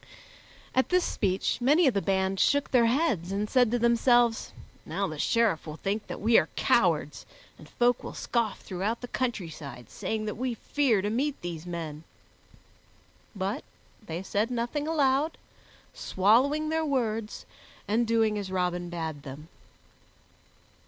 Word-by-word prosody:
At 260 - +2
this 360 0 +3
speech 190 +5 -1
many 295 +8 +4
of 265 - +4
the 200 - 0
band 190 0 0
shook 285 0 +2
their 240 -3 +5
heads, 230 - +1
and 205 +2 -1
said 245 0 +3
to 245 - +1
themselves, 235 0 +3 0.3
"Now - - -2
the - - -7
Sheriff 225 -10 +1
will 155 - -6
think 205 +5 -3
that - - -6
we 225 +2 +5
are - - -2
cowards, - - +2 0.4
and - - -14
folk 245 0 +1
will - - -7
scoff 230 -4 -1
throughout 200 +5 -3
the 245 - -6
countryside, 160 - -4
saying 220 -1 -3
that 210 - -2
we 250 0 -2
fear 235 -5 +1
to 205 - -1
meet 275 +5 -1
these 175 -1 -6
men." 160 -3 -5 1.3
But 200 +7 -2 0.4
they 170 -2 -5
said 210 +4 0
nothing 250 +5 -2
aloud, 290 0 +1 0.6
swallowing 265 +11 +2
their 320 0 0
words 225 -7 -2 0.4
and 225 +3 +1
doing 220 -2 +2
as 195 -2 -5
Robin 180 -1 -1
bade 160 -4 -4
them. 140 +3 -10
220 Hz, 150 wpm, -28 LUFS, 190-250 Hz, 1.3 s, their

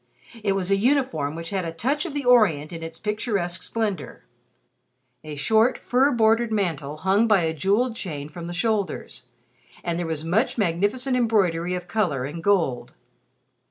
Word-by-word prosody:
It 200 -2 +2
was 195 -1 -1
a 195 - +4
uniform 200 - +1
which 165 +2 -6
had 190 -2 -1
a 165 - -3
touch 275 - -1
of 295 - -7
the 285 -2 -2
Orient 180 -11 +4
in 165 - -6
its 165 0 -7
picturesque 205 -4 -2
splendor. 205 - -4 1.0
A 155 -1 -7
short 220 - +3
fur 265 +3 +2
bordered 225 -1 +3
mantle 160 -8 -2
hung 195 +7 +2
by 210 -4 +4
a 160 -1 0
jeweled 205 - +1
chain 150 -9 -5
from 170 +3 -8
the - - -5
shoulders, 195 - -2 0.6
and 170 0 -2
there 175 - -2
was 160 -1 -3
much 210 +12 +1
magnificent 205 +7 0
embroidery 185 -8 +1
of 180 0 -6
color 175 -10 0
and 160 +4 -6
gold. 170 -11 +1
190 Hz, 165 wpm, -24 LUFS, 165-225 Hz, 1.0 s, a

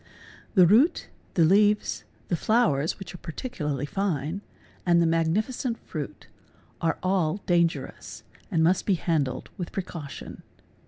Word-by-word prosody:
The 185 -3 +8
root, 230 - +4 0.3
the 170 - +5
leaves, 205 +4 +3 0.2
the 175 - +1
flowers; 165 - +2
which 195 - -9
are 180 - -9
particularly 150 - -4
fine, 170 0 -2 0.4
and 175 -1 +4
the 170 - +4
magnificent 210 - 0
fruit, - - -7 0.6
are 165 -1 +1
all 185 -2 +1
danger 170 -5 +1
ous - - -11 0.3
and 160 -1 +2
must 180 +3 +2
be 200 - +4
handled 155 -6 -1
with 175 - -4
precaution. 165 -7 -6
175 Hz, 130 wpm, -26 LUFS, 160-195 Hz, 0.6 s, The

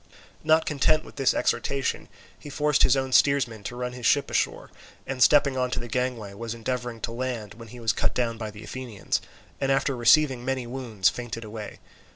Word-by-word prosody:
Not 160 +1 +4
content 155 +2 +2
with - - -14
this 135 -2 +2
exhortation, 135 -2 -1 0.3
he 145 - -10
forced 150 +1 +1
his 135 +1 +5
own 130 0 -1
steersman 130 -6 +3
to 120 - -5
run 125 0 -3
his 125 -2 -2
ship 145 - +2
ashore, - - -1 0.3
and 130 -1 -4
stepping 140 0 +5
on 125 0 +1
to - - -2
the 120 - -6
gangway, 120 -4 -2
was 115 +2 -5
endeavouring 120 0 -4
to - - -3
land, 115 -4 -4
when 115 +1 -12
he 120 +3 -11
was 115 -2 +1
cut - - -1
down 115 -2 -1
by 110 -2 -4
the 105 0 -11
Athenians, 120 -1 -3 0.4
and 135 -1 +1
after 135 0 +1
receiving 130 +1 +4
many 130 -1 -2
wounds 120 -7 -1
fainted 120 -1 -6
away. 110 -1 -8
125 Hz, 200 wpm, -26 LUFS, 115-135 Hz, 0.4 s, his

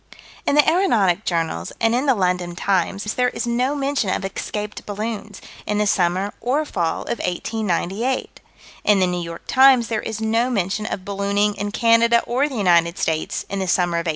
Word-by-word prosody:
In - - +3
the 295 - +5
aeronautic 225 - +2
journals 165 - -2
and 225 0 +2
in 255 +4 0
the 265 - +4
London 180 -3 -1
Times 195 +1 0
there 250 0 +1
is - - -4
no 250 +4 0
mention 275 -6 -1
of 190 - -1
escaped 210 +2 -5
balloons, 210 0 -5 0.3
in 210 - 0
the 210 - +2
summer 185 +1 +1
or 280 +6 0
fall 170 - -2
of - - -4
1898. 215 +5 -2 0.4
In 210 -2 +4
the 185 - +4
New 180 -1 -2
York 170 0 -7
Times 260 -3 +5
there 220 -2 -1
is 220 -1 -5
no 225 +3 +1
mention 205 -1 -1
of 185 - -5
ballooning 200 +1 0
in 205 0 -4
Canada 230 +1 +4
or 260 +5 0
the 270 - -7
United 170 -5 +3
States, 160 -1 -2
in 200 - -4
the 190 - -2
summer 175 -1 +1
of 170 +1 -2
1898. - - +1
210 Hz, 190 wpm, -21 LUFS, 180-235 Hz, 0.4 s, the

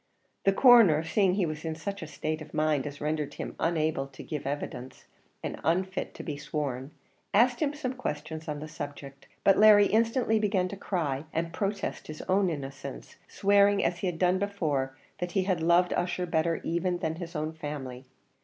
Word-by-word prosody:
The 195 - +6
Coroner, 200 - +7
seeing 185 +2 +2
he 195 -3 +2
was 155 -1 -5
in 160 -1 -3
such 195 +5 -5
a 160 - -6
state 155 +1 -3
of 155 -1 -10
mind 150 -3 +1
as 145 0 -8
rendered 150 -1 -2
him - - -6
unable 155 -4 0
to 135 -1 -11
give 150 -4 -5
evidence 140 -2 -5 0.4
and - - -4
unfit 185 +4 -1
to - - -7
be 150 -4 -4
sworn, 140 -3 -3 0.5
asked 240 +3 +4
him 295 -1 0
some 265 -4 -3
questions 160 -10 -5
on 150 -1 -4
the 155 - -6
subject, 145 -3 -8 0.2
but 195 - +5
Larry 210 -1 +8
instantly 225 +1 +2
began 195 -3 +1
to 200 - -6
cry, 160 -8 -2
and 165 +1 -2
protest 200 -1 -3
his 155 0 -7
own 190 0 +2
innocence, 135 - -7
swearing, 200 0 +3
as 175 0 0
he 190 - -1
had 175 -2 -2
done 180 +1 +2
before, 150 -10 -1 0.2
that 180 0 -3
he 195 - +2
had 185 -3 0
loved 170 +2 +4
Ussher 180 0 -1
better 165 0 0
even 175 +2 0
than 160 -2 -3
his 170 -1 -7
own 155 +1 -2
family. 140 -5 -6
165 Hz, 190 wpm, -28 LUFS, 150-195 Hz, 0.5 s, Larry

